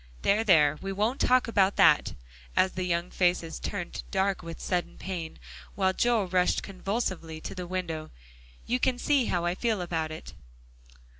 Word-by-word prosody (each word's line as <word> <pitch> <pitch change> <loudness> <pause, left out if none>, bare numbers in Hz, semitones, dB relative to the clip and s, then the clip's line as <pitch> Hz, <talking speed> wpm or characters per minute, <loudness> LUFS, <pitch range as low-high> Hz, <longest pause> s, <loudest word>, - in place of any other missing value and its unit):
There, 210 +3 +3
there, 155 -8 +4
we 195 - -4
won't 215 +7 0
talk 255 0 +4
about 200 -3 +3
that," - - +5 0.4
as 190 - +3
the 185 -1 -3
young 170 0 -1
faces 175 -3 0
turned 180 -4 -4
dark 195 0 0
with 165 0 -8
sudden 180 -2 -2
pain, 175 -4 -5 0.4
while 190 -1 +2
Joel 230 -2 +2
rushed 180 0 +2
convulsively 190 -5 -3
to - - -6
the 180 -1 -6
window, 165 -4 -4 0.6
"you 250 +1 0
can 255 -1 +1
see 275 -1 +2
how 175 -4 0
I 175 - +1
feel 220 +1 -1
about 165 -3 -2
it." 155 0 -9
185 Hz, 165 wpm, -28 LUFS, 170-205 Hz, 0.6 s, that